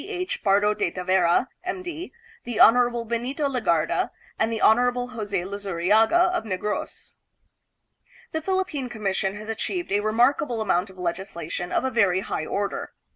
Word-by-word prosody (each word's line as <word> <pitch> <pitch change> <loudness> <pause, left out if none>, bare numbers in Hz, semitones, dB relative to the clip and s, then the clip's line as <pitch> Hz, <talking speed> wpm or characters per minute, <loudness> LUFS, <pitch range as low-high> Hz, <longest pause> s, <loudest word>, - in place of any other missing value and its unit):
H. 370 -2 -4
Pardo 205 +1 +3
de 190 - -1
Tavera, 180 +4 +2 0.2
M. 365 0 -4
D., 350 0 -6 0.3
the 240 -2 -4
Hon. 240 0 +5
Benito 250 +6 -1
Legarda, 185 - +1 0.3
and 220 +1 +1
the 225 - -2
Hon. 245 +2 +3
Jose 210 -5 -3
Luzu 200 0 -5
riaga 220 - +4
of - - -1
Negros. 210 0 -4 1.1
The 320 - -2
Philippine 370 -8 -1
Commission 195 -3 -2
has 215 +1 -8
achieved 345 - -3
a 205 - +3
remarkable 235 +3 +2
amount 195 -2 +1
of 190 - -15
legislation 175 -1 -4
of - - +1
a 260 - 0
very 195 -6 +3
high 155 - -3
order. 200 0 -3
220 Hz, 150 wpm, -25 LUFS, 195-250 Hz, 1.1 s, Hon